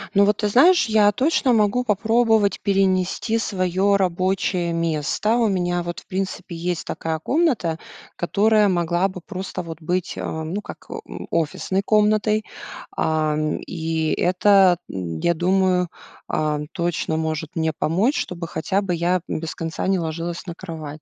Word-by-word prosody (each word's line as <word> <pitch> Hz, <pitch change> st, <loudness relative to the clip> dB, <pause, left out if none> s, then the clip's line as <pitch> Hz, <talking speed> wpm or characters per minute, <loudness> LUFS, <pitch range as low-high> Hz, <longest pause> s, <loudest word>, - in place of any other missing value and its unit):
Ну, 200 Hz, +1 st, +6 dB
вот 210 Hz, 0 st, +2 dB
ты 210 Hz, -, 0 dB
знаешь, 270 Hz, -, +5 dB
я 215 Hz, -1 st, +4 dB
точно 260 Hz, +2 st, +2 dB
могу 215 Hz, +2 st, +2 dB
попробовать 220 Hz, -1 st, +2 dB
перенести 195 Hz, +2 st, +1 dB
своё 190 Hz, -1 st, +1 dB
рабочее 185 Hz, -1 st, 0 dB
место. 165 Hz, +6 st, 0 dB
У 235 Hz, -2 st, +3 dB
меня 175 Hz, -3 st, 0 dB
вот, 175 Hz, 0 st, -5 dB
в -, -, -21 dB
принципе, 185 Hz, -2 st, -4 dB
есть 175 Hz, 0 st, -3 dB
такая 160 Hz, -1 st, -3 dB
комната, 245 Hz, -, +1 dB, 0.4 s
которая 210 Hz, +3 st, +3 dB
могла 175 Hz, +1 st, +1 dB
бы 185 Hz, -2 st, -9 dB
просто 185 Hz, 0 st, -5 dB
вот 165 Hz, -2 st, -8 dB
быть, 180 Hz, +2 st, -2 dB
а, 160 Hz, 0 st, -4 dB
ну, 180 Hz, +6 st, -3 dB
как, -, -, -11 dB, 0.2 s
м, -, -, -8 dB
офисной 170 Hz, +4 st, -1 dB
комнатой. 215 Hz, 0 st, +2 dB, 0.5 s
Ам, 155 Hz, -1 st, 0 dB
и 160 Hz, -2 st, -2 dB
это, 185 Hz, 0 st, +4 dB
м, 85 Hz, -4 st, -4 dB
я 170 Hz, -, +2 dB
думаю, 180 Hz, +1 st, +2 dB, 0.4 s
ам, 150 Hz, -1 st, -1 dB
точно 170 Hz, -2 st, -1 dB
может 160 Hz, 0 st, -3 dB
мне 160 Hz, -1 st, +1 dB
помочь, 195 Hz, -, +1 dB
чтобы 170 Hz, -1 st, -4 dB
хотя 190 Hz, +5 st, -1 dB
бы 180 Hz, -3 st, -1 dB
я, 175 Hz, +2 st, +1 dB
м, -, -, -2 dB
без 160 Hz, 0 st, -5 dB
конца 165 Hz, -1 st, -4 dB
не 190 Hz, -2 st, +2 dB
ложилась 165 Hz, +1 st, -4 dB
на 170 Hz, -, -5 dB
кровать. 155 Hz, -5 st, -8 dB
180 Hz, 155 wpm, -22 LUFS, 165-205 Hz, 0.5 s, Ну